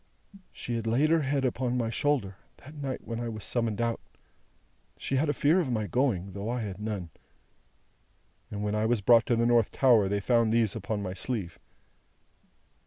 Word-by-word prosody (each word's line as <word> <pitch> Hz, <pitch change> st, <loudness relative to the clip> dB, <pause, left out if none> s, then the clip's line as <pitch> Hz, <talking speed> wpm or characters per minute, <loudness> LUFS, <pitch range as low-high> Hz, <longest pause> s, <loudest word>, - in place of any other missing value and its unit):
"She 120 Hz, -, -6 dB
had 115 Hz, -1 st, -4 dB
laid 135 Hz, +8 st, +2 dB
her 165 Hz, -1 st, +4 dB
head 135 Hz, -1 st, 0 dB
upon 125 Hz, 0 st, -1 dB
my 115 Hz, -2 st, -1 dB
shoulder, 120 Hz, -10 st, 0 dB, 0.2 s
that 145 Hz, +2 st, -13 dB
night 140 Hz, -3 st, -5 dB
when 115 Hz, 0 st, -4 dB
I 120 Hz, -1 st, -3 dB
was 110 Hz, -2 st, -7 dB
summoned 115 Hz, -4 st, -1 dB
out 115 Hz, -1 st, 0 dB, 1.0 s
she 135 Hz, -, -2 dB
had 150 Hz, +3 st, +1 dB
a -, -, +4 dB
fear 150 Hz, +5 st, +3 dB
of 160 Hz, -7 st, -1 dB
my 110 Hz, -3 st, -1 dB
going, 100 Hz, -6 st, 0 dB
though 100 Hz, +3 st, -4 dB
I 125 Hz, 0 st, -2 dB
had 100 Hz, -3 st, -5 dB
none 100 Hz, -6 st, -4 dB, 1.4 s
and 105 Hz, 0 st, -5 dB
when 105 Hz, 0 st, -1 dB
I 105 Hz, +1 st, +1 dB
was 120 Hz, -1 st, +2 dB
brought 115 Hz, +3 st, +5 dB
to 120 Hz, -, +2 dB
the 115 Hz, +1 st, +1 dB
North 120 Hz, -2 st, +3 dB
Tower 115 Hz, -7 st, +4 dB
they 100 Hz, +1 st, 0 dB
found 115 Hz, +1 st, +2 dB
these 115 Hz, -2 st, +2 dB
upon 105 Hz, -1 st, -3 dB
my 90 Hz, -2 st, -4 dB
sleeve. 95 Hz, -3 st, -4 dB
115 Hz, 190 wpm, -28 LUFS, 105-130 Hz, 1.4 s, brought